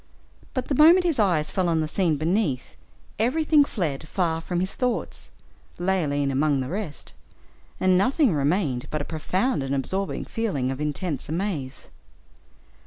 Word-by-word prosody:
But 255 -1 -1
the - - -1
moment 330 +6 +7
his 330 -8 0
eyes 175 -7 +2
fell 185 -2 0
on 165 -1 +2
the 155 - 0
scene 165 -2 +1
beneath, 160 - -1 0.4
everything 300 +5 +4
fled 160 - -3
far 165 -2 -1
from 175 +1 -2
his 185 +1 -1
thoughts, 250 -1 -3 0.5
Leoline 155 -7 0
among 140 +1 +2
the 130 0 -3
rest; 185 -5 -6 0.7
and 185 -1 +4
nothing 255 - +3
remained 145 -3 0
but 155 -1 -2
a - - -8
profound 180 - -1
and 135 +1 -2
absorbing 190 +9 -2
feeling 160 - -2
of 135 +2 -5
intensest 150 0 -3
amaze. 160 -7 -4
175 Hz, 150 wpm, -25 LUFS, 145-205 Hz, 0.7 s, moment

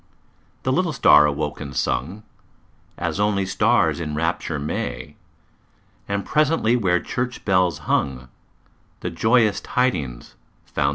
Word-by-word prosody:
The 130 - 0
little 170 +2 0
star 75 - +6
awoke 75 +1 -3
and 70 -2 -7
sung 80 - -2 0.7
As - - -3
only 105 -2 +1
stars 95 - +2
in 75 -3 -4
rapture 80 0 -1
may, 70 -1 -4 0.9
And 100 0 -2
presently 150 -6 +2
where 90 -7 +2
church 125 +4 -4
bells 90 -5 +2
hung 65 -2 -1 0.7
The 90 - -3
joyous 110 +3 +2
tidings 75 - -2 0.3
found - - -31
their 75 - +1
way. - - +4
90 Hz, 130 wpm, -22 LUFS, 75-110 Hz, 0.9 s, star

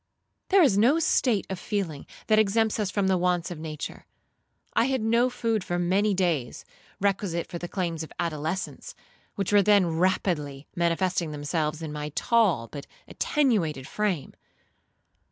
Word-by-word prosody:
There 390 -2 +6
is 205 -9 +4
no 255 +9 +5
state 250 -9 +2
of 190 -2 -5
feeling 190 -8 -3 0.2
that 215 -1 +4
exempts 220 +1 +2
us 205 -3 0
from 200 0 0
the 190 -1 +2
wants 180 0 0
of 170 - -6
nature. 155 -1 -7 0.7
I 230 - +3
had 260 -2 0
no 235 +3 +3
food 230 -4 -1
for 175 - -2
many 195 +4 +2
days 165 -10 -1 0.3
requisite 190 -4 0
for 170 - -7
the 175 - -5
claims 170 -3 -3
of 160 - -7
adolescence, 170 - -3 0.4
which 200 -1 -2
were 205 - +7
then 200 -1 +5
rapidly 155 -6 0
manifesting 170 0 0
themselves 150 +1 -2
in 155 -2 -5
my 150 0 -4
tall, 210 - +2
but 140 +3 -9 0.2
attenuated 185 - 0
frame. 195 -9 -2
185 Hz, 155 wpm, -26 LUFS, 160-210 Hz, 0.7 s, were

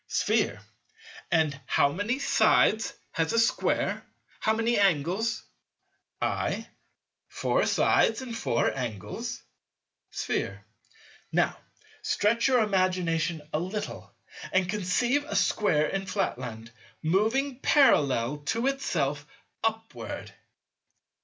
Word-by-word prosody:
Sphere. - - +1 0.7
And 155 -4 +1
how 140 - +3
many 205 - -1
sides 220 -5 +3 0.2
has 165 -1 -1
a 230 - +3
Square? 230 - +1 0.4
How 220 - +1
many 225 +1 +1
angles? 195 +4 +1 0.8
I. - - -1 0.6
Four - - 0
sides 225 +4 +3
and 240 -3 -6
four 115 - 0
angles. 110 -7 -5 0.7
Sphere. 100 +1 -3 0.7
Now - - +2 0.5
stretch 230 +4 +2
your 250 -4 +4
imagination 180 -5 0
a 155 - +1
little, 190 +5 -5 0.4
and 185 -1 +2
conceive 210 +8 +1
a 200 - -5
Square 160 -6 +2
in 195 0 -3
Flatland, 125 - -3 0.3
moving 225 - +1
parallel 145 - +3
to 230 +2 0
itself 150 - -1 0.4
upward. 225 0 -4
190 Hz, 100 wpm, -28 LUFS, 150-225 Hz, 0.8 s, your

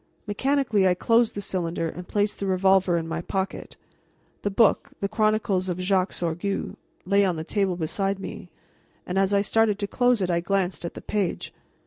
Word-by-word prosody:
Mechanically 225 -2 +1
I 180 - +3
closed 230 +4 +2
the 205 - -3
cylinder 175 -4 -2
and 180 +2 -7
placed 205 0 0
the 200 - -2
revolver 190 -1 +3
in 165 -1 -3
my 165 0 -3
pocket. 190 +2 -4 0.6
The 205 - -1
book, 205 +2 +3
the 200 - -1
Chronicles 215 -3 +1
of 180 - -2
Jacques 185 0 +1
Sorgue, 175 +4 -3 0.3
lay 200 +2 +3
on 185 -3 +1
the 160 - -4
table 195 +1 0
beside 195 +4 -1
me, 195 - -8 0.6
and 185 +1 -1
as 195 0 +2
I 200 0 +3
started 215 0 +2
to 205 - -2
close 245 +2 +2
it 185 -2 0
I 170 - +2
glanced 185 0 -1
at 170 - -6
the - - -7
page. 200 -4 -2
195 Hz, 185 wpm, -25 LUFS, 180-205 Hz, 0.6 s, I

